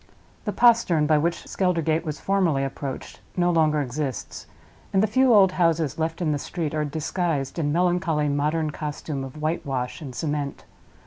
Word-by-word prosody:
The 210 - 0
postern 225 -10 +4
by 155 0 +4
which 170 +3 -1
Skeldergate 165 -4 0
was 155 -3 -5
formerly 180 -8 +1
approached 135 0 -5 0.2
no 175 0 +3
longer 155 -3 +3
exists; 130 -2 -5 0.4
and 195 0 +3
the - - +5
few 255 +4 +3
old 195 -4 +6
houses 165 -5 +1
left 165 +2 -1
in 155 - +1
the 145 - -1
street 160 -2 -4
are 155 -1 0
disguised 155 0 -2
in 145 -2 0
melancholy 175 -2 +1
modern 150 +2 0
costume 150 -2 -4
of 135 +3 -8
whitewash 140 -4 -2
and 135 -5 -7
cement. 145 0 -3
155 Hz, 165 wpm, -24 LUFS, 145-175 Hz, 0.4 s, old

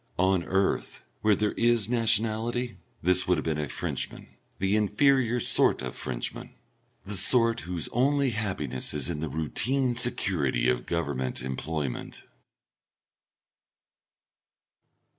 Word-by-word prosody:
On 95 -1 +2
earth, 95 +1 -1 0.2
where 105 -1 +4
there 105 0 0
is 115 -3 +2
nationality, 115 +1 0 0.2
this 90 +1 +3
would 90 -1 +3
have 75 - -3
been 80 -2 -1
a 75 -2 -3
Frenchman - - -4 0.3
the 95 +2 +1
inferior 120 +3 +2
sort - - +3
of - - -5
Frenchman - - -4 0.5
the 100 +1 -4
sort 115 +4 +3
whose 85 -2 -4
only 140 +2 +2
happiness 90 - -2
is 75 +3 0
in 75 - -4
the 80 0 -3
routine 125 - 0
security 90 - +1
of 60 -1 0
Government 70 -7 -2
employment. 70 +1 -4
95 Hz, 120 wpm, -27 LUFS, 75-115 Hz, 0.5 s, where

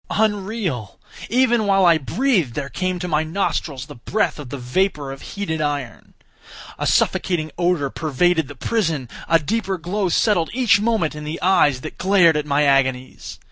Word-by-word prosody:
Unreal!—Even 215 - -1
while 195 -1 +4
I 170 -2 +5
breathed 175 - 0
there 140 -1 -4
came 185 +5 -2
to 180 0 -4
my 155 -2 +1
nostrils 155 -5 -2
the - - -11
breath 155 - -2
of 140 -4 -8
the 140 - -5
vapour 140 +2 -1
of 135 - -9
heated 180 -6 -4
iron! 145 -5 -4 0.6
A - - -1
suffocating 160 -4 +1
odour 175 -6 0
pervaded 160 +1 +1
the 145 - -10
prison! 160 - -1 0.2
A 165 - +6
deeper 190 +4 -2
glow 185 +3 -2
settled 175 -2 +2
each 245 -4 +3
moment 215 -8 0
in 150 0 -8
the 155 +2 -5
eyes 145 -8 +3
that - - -9
glared 185 -4 +4
at 150 0 -2
my 145 +1 +2
agonies! 130 -2 0
165 Hz, 165 wpm, -21 LUFS, 145-195 Hz, 0.6 s, A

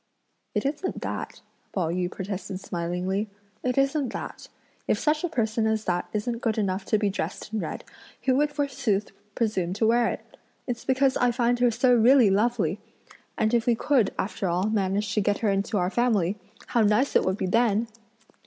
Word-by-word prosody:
"It - - 0
isn't 300 +7 -2
that," - - -5 0.3
Pao 175 -5 0
yü 180 0 -1
protested 190 -1 -5
smilingly, 180 +3 -2 0.3
"it 250 0 -1
isn't 275 -1 +1
that; - - -7 0.4
if - - +2
such 305 +1 +1
a 350 - 0
person 220 -6 0
as 220 0 0
that 175 -1 -1
isn't 230 +2 -2
good 225 -2 0
enough 195 -2 -1
to 215 - +2
be 205 -2 0
dressed 205 - -5
in 220 - 0
red, - - -5 0.4
who 260 -1 +3
would 295 +2 +2
forsooth 275 -8 -1 0.2
presume 190 -6 0
to 215 +3 0
wear 235 +1 +4
it? - - -6 0.3
It's 240 -2 -4
because 265 0 +2
I 245 - +3
find 240 0 +1
her 245 0 +4
so 245 +2 +3
really 240 -2 +6
lovely! 210 -3 +1 0.6
and 220 +1 +1
if 235 0 +2
we 240 - +4
could, 240 -4 +2
after 195 0 -2
all, 185 +5 0
manage 200 0 0
to 210 - +2
get 205 0 +1
her 205 - +3
into 195 +2 0
our 180 0 0
family, 210 -7 +2 0.3
how 235 - +2
nice 215 +6 +2
it - - +5
would 185 +1 0
be - - -1
then!" 225 +2 +2
220 Hz, 190 wpm, -26 LUFS, 195-245 Hz, 0.6 s, really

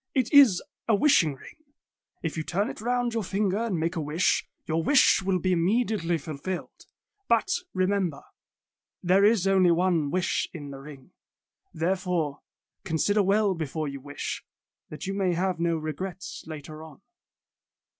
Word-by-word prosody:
It 255 -1 0
is 270 -11 +7 0.2
a 225 - +4
wishing 200 - +3
ring. 130 - -14 0.7
If 165 - -2
you 160 - -2
turn 190 +6 -1
it - - -11
round 245 0 0
your 225 - 0
finger 195 +1 0
and 225 -7 -1
make 165 +3 -1
a 165 - -1
wish, 155 +4 +1 0.2
your 160 +1 0
wish 265 - +4
will 190 -1 +1
be 185 +1 0
immediately 180 -1 +1
ful 155 -1 -7
filled. 185 +5 -6 0.4
But, 235 +7 +3 0.3
remember, 185 -4 0 0.8
there 185 +3 +4
is 210 -2 +4
only 190 -2 +4
one 170 -3 +2
wish 185 +3 0
in 145 -3 -7
the 135 - -8
ring. 135 -2 -12 0.6
Therefore, 170 -3 -1 0.4
consider 190 +5 +1
well 200 +1 +2
before 155 -2 -3
you 140 -1 -6
wish, 145 +1 -5 0.5
that 155 - -7
you 195 - -3
may 190 -3 0
have 180 0 -1
no 170 -1 +1
regrets 170 +4 -6
later 155 0 -8
on." 155 -4 -14
180 Hz, 155 wpm, -27 LUFS, 160-200 Hz, 0.8 s, is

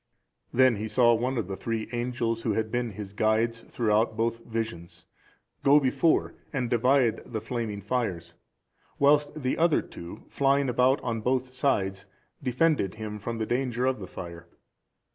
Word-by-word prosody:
Then 130 -3 +4
he 110 +2 -3
saw 120 +2 +4
one 125 +3 0
of 110 -6 -1
the 95 - -4
three 115 +1 -3
angels, 120 -1 -1
who 115 -2 0
had 110 +1 -1
been 120 -3 -1
his 100 0 -8
guides 110 +2 +1
throughout 110 -2 +1
both 115 +1 0
visions, 90 -7 -5 0.6
go 140 +2 +6
before 140 +4 +2 0.2
and 125 -5 -2
divide 125 0 +3
the 110 - -5
flaming 110 -2 -4
fires, 95 -8 -2 0.6
whilst 145 +1 +3
the 130 - 0
other 165 -1 +3
two, 85 0 -10
flying 140 0 +2
about 125 +3 +3
on 115 -2 -2
both 130 +2 0
sides, 95 -8 0 0.3
defended 130 - +1
him 105 -1 -6
from 115 +3 -4
the 110 - -1
danger 125 +1 -1
of 130 -3 +1
the 95 - -7
fire. 85 -1 -9
115 Hz, 160 wpm, -27 LUFS, 110-130 Hz, 0.6 s, go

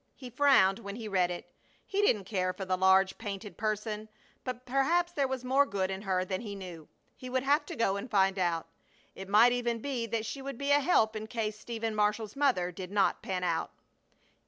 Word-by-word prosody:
He 255 -2 -10
frowned 240 -7 +4
when 200 -3 -7
he 225 -1 -6
read 185 -3 +2
it. 175 - -7 0.3
He 395 +1 0
didn't 220 - +3
care 185 -2 -1
for 190 - -6
the 185 0 +1
large, 190 +1 +4
painted 205 -3 -6
person, 215 +1 -3 0.3
but 255 -1 -5
perhaps 325 +7 +2
there 280 -4 +1
was 260 -1 -4
more 265 +3 +4
good 195 -7 -2
in 190 0 -4
her 185 -2 0
than 185 0 -3
he 205 -3 -6
knew. 175 -5 -9 0.3
He 255 - -9
would 260 0 0
have 290 +3 +2
to 340 - -6
go 200 -6 +1
and 200 +6 -6
find 195 -3 +2
out. 170 -2 0 0.5
It 190 0 -9
might 220 +4 +6
even 240 -1 0
be 240 -1 -3
that 225 0 -2
she 270 +5 -5
would 275 -2 -6
be 280 +2 -1
a 285 - +6
help 265 -8 +2
in 215 0 -5
case 215 -2 -3
Stephen 225 -1 -4
Marshall's 210 0 0
mother 255 -11 +1
did 180 +1 -7
not 200 -1 +2
pan 185 -1 -3
out. 170 -2 0
215 Hz, 215 wpm, -30 LUFS, 190-255 Hz, 0.5 s, might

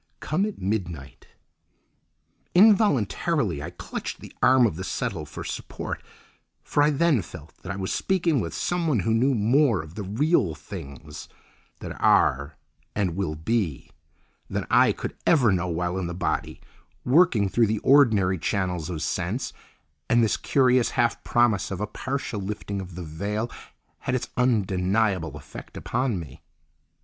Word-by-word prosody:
Come 190 +7 0
at 215 - -6
midnight—" 90 -8 -4 1.3
Involuntarily 165 - +3
I 80 - -5
clutched 90 - -6
the - - -12
arm 130 -1 +6
of 100 -9 0
the 95 - -5
settle - - -3
for - - -7
support, - - -5 0.6
for 145 - +1
I 145 - +5
then 150 -4 +2
felt 80 -2 -12
that 95 - -6
I - - -4
was 95 -1 -3
speaking 170 -6 +1
with 85 -7 -4
someone 165 - 0
who 110 +5 +1
knew 130 +4 +3
more 120 +1 +3
of 80 0 -12
the 105 - -6
real 105 - +1
things 75 -3 -9 0.5
that - - -6
are 70 +3 +3 0.4
and 95 -5 0
will 90 -5 -2
be, 80 - -2 0.6
than - - -2
I - - +6
could - - -5
ever 130 -10 +5
know 90 -1 0
while 90 +2 -2
in 90 - -2
the 85 - -5
body, 90 - -2 0.4
working 125 - +4
through 115 +4 +2
the 110 +1 0
ordinary 110 - +4
channels 90 -3 -1
of 80 -4 -4
sense—and 75 +10 -2
this 110 - +2
curious 130 -3 +3
half 120 - 0
promise 120 -5 +2
of 95 - -4
a 105 - -1
partial 130 0 -4
lifting 100 0 -4
of 90 -2 -9
the 90 - -6
veil 100 +9 -3 0.5
had 125 - -2
its 130 - -3
undeniable 95 - +1
effect 75 0 -11
upon 125 -6 -1
me. 70 -6 -10
100 Hz, 150 wpm, -25 LUFS, 85-125 Hz, 1.3 s, arm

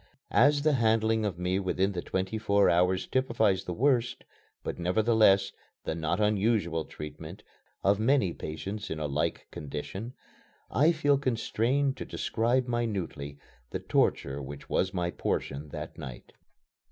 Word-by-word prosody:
As 145 +3 +5
the 155 0 +4
handling 110 -2 +2
of 95 -5 -2
me 90 +2 0
within 95 +1 0
the 90 -3 -3
twenty 95 +5 -2
four 100 -2 +3
hours 90 +2 +2
typifies 110 -7 +1
the 90 - -3
worst, 125 -1 +1 0.4
but, - - -4
nevertheless, 100 +1 +4 0.3
the - - -2
not 80 +4 -1
unusual 105 -6 +1
treatment 75 0 -9 0.4
of 100 +2 +3
many 110 -6 +2
patients 95 +7 -5
in 80 - -3
a 75 - -2
like 75 +1 -1
condition, 95 - -6 0.6
I 150 +5 +4
feel 145 -4 +2
constrained 130 +2 0
to - - -5
describe 120 +3 0
minutely 100 -12 -3 0.3
the - - -3
torture 70 +1 0
which 70 +1 -8
was 95 - +1
my 90 -2 -1
portion 75 -2 -3
that - - -7
night. 65 -2 -9
100 Hz, 140 wpm, -29 LUFS, 85-115 Hz, 0.6 s, As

